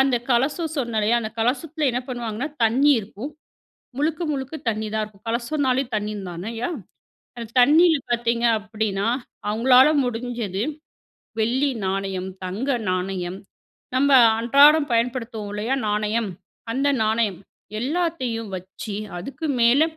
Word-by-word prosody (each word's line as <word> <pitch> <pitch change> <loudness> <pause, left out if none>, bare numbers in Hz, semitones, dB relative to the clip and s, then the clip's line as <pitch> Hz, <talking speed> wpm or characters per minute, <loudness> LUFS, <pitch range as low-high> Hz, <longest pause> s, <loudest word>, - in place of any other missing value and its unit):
அந்த 265 -2 +3
கலசம் 290 +7 +1
சொன்னேன் 235 -5 -1
இல்லயா? 230 +3 +2
அந்த 215 - -4
கலசத்தில 295 +6 0
என்ன 245 - -1
பண்ணுவாங்கன்னா, 240 +2 -3 0.2
தண்ணீ 260 +6 +4
இருக்கும். 220 +6 -8 0.7
முழுக்க, 315 +3 0
முழுக்க 270 +2 -4
தண்ணீ 220 0 -2
தான் 215 - +1
இருக்கும். 210 0 -19
கலசம்னாலே 260 +2 0
தண்ணீ 210 0 -2 0.2
தானய்யா! 225 - -4 0.7
அந்த 230 -1 -6
தண்ணியில 315 +5 +6
பார்த்தீங்க 235 0 +1
அப்பிடின்னா, 210 -1 -2 0.4
அவங்களால 250 +5 +6 0.2
முடிஞ்சது 230 -5 -3 0.8
வெள்ளி 255 +6 +2 0.2
நாணயம், 190 -1 -2 0.2
தங்க 200 +9 -3 0.2
நாணயம். 185 0 -2 0.6
நம்ம 280 +2 +3 0.3
அன்றாடம் 285 +5 +6
பயன்படுத்துவோம் 230 -2 -1
இல்லயா? 220 +5 -1
நாணயம். 210 +1 0 0.4
அந்த 275 +4 +1
நாணயம் 215 -3 0 0.4
எல்லாத்தையும் 260 -6 -2
வச்சு, 190 +4 -7 0.2
அதுக்கு 270 - -6 0.2
மேல 240 +6 +5
235 Hz, 115 wpm, -23 LUFS, 215-270 Hz, 0.8 s, தண்ணியில